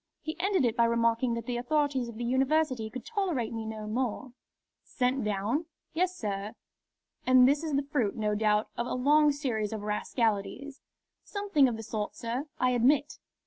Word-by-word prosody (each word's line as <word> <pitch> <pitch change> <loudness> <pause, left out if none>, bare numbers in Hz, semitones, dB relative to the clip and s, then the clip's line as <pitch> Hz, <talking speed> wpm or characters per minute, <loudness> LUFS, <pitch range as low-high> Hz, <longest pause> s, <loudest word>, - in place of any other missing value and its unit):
He 315 +1 -5
ended 380 -5 +2
it 235 -1 +1
by 235 -1 +4
remarking 230 +1 +2
that 230 -1 -5
the 245 0 -2
authorities 275 -2 0
of 230 - -9
the 240 - -5
University 260 -1 +1
could 245 +3 -8
tolerate 360 - -1
me 225 -1 -4
no 215 -1 -6
more." 245 +2 -3 0.5
"Sent 255 0 -1
down?" 210 - -1 0.3
"Yes, 365 +2 0
sir." 205 0 -3 0.7
"And 255 -1 +7
this 285 +3 +2
is 310 -3 -1
the 280 - +1
fruit, 255 -8 0
no 215 -2 0
doubt, 210 0 +1
of 235 - -2
a - - -2
long 295 +4 +4
series 240 -8 -2
of 215 -2 -5
rascalities." 225 +6 -2 0.4
"Something 400 -9 +2
of 235 -3 -2
the 225 - -7
sort, 210 -1 -4
sir, 240 +6 -3
I 255 0 +3
admit." 275 +5 +2
250 Hz, 180 wpm, -29 LUFS, 220-285 Hz, 0.7 s, And